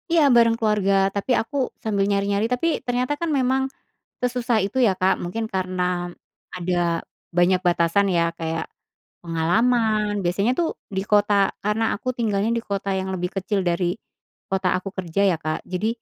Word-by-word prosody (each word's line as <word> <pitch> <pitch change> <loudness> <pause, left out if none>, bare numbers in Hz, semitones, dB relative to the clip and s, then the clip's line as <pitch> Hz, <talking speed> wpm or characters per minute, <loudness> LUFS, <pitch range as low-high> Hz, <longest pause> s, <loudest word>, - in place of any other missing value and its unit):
Iya, 330 -1 +4
bareng 230 -1 +5
keluarga, 210 -3 +1 0.2
tapi 200 +6 -2
aku 225 - -9 0.3
sambil 200 -3 +1
nyari-nyari, 200 +1 +1
tapi 250 +7 0 0.2
ternyata 250 +3 0
kan 335 - 0
memang 265 +1 +2 0.6
sesusah 245 -2 0
itu 200 +6 -5
ya, - - +4
Kak. 185 +1 +3
Mungkin 220 +6 -3
karena 185 -1 -1 0.7
ada 180 0 -1 0.6
banyak 180 +1 +4
batasan 175 +3 +3
ya, 170 - +3 0.2
kayak 165 0 -2 0.6
pengalaman, 215 +6 +1 0.2
biasanya 195 +7 +1
tuh 335 - +2 0.3
di 190 - 0
kota 205 0 +4 0.3
karena 210 +2 0
aku 225 - -10
tinggalnya 215 -2 0
di - - -2
kota 200 0 -2
yang 190 0 -4
lebih 180 0 -3
kecil 195 +2 0
dari 175 +1 0 0.5
kota 190 -1 0
aku 185 +2 -5
kerja 180 +1 -1
ya - - +1
Kak, 155 0 -1
jadi 185 +4 -1
200 Hz, 155 wpm, -23 LUFS, 180-230 Hz, 0.7 s, bareng